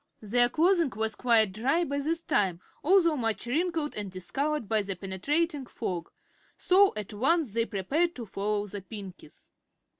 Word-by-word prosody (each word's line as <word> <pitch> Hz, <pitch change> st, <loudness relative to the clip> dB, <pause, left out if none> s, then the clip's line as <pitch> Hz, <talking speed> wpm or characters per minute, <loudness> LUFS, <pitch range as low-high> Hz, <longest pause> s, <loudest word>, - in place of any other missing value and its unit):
Their 240 Hz, +3 st, +4 dB
clothing 335 Hz, +1 st, +3 dB
was 220 Hz, 0 st, -1 dB
quite 225 Hz, -3 st, +3 dB
dry 265 Hz, -, +1 dB
by 285 Hz, -3 st, -2 dB
this 325 Hz, +4 st, -2 dB
time, 185 Hz, -4 st, +1 dB, 0.2 s
although 335 Hz, -1 st, +4 dB
much 225 Hz, -5 st, -2 dB
wrinkled 320 Hz, +3 st, -1 dB
and 205 Hz, -2 st, -4 dB
discolored 270 Hz, -, -2 dB
by 220 Hz, 0 st, +2 dB
the 195 Hz, -1 st, -4 dB
penetrating 275 Hz, -, -2 dB
fog, 175 Hz, -8 st, -4 dB, 0.5 s
so 390 Hz, +2 st, +5 dB
at 210 Hz, 0 st, -5 dB
once 275 Hz, -, +1 dB
they 230 Hz, 0 st, +1 dB
prepared 290 Hz, -, 0 dB
to 240 Hz, -, -6 dB
follow 205 Hz, +1 st, -2 dB
the 205 Hz, 0 st, -7 dB
Pinkies. 195 Hz, -2 st, -11 dB
235 Hz, 155 wpm, -28 LUFS, 205-315 Hz, 0.5 s, so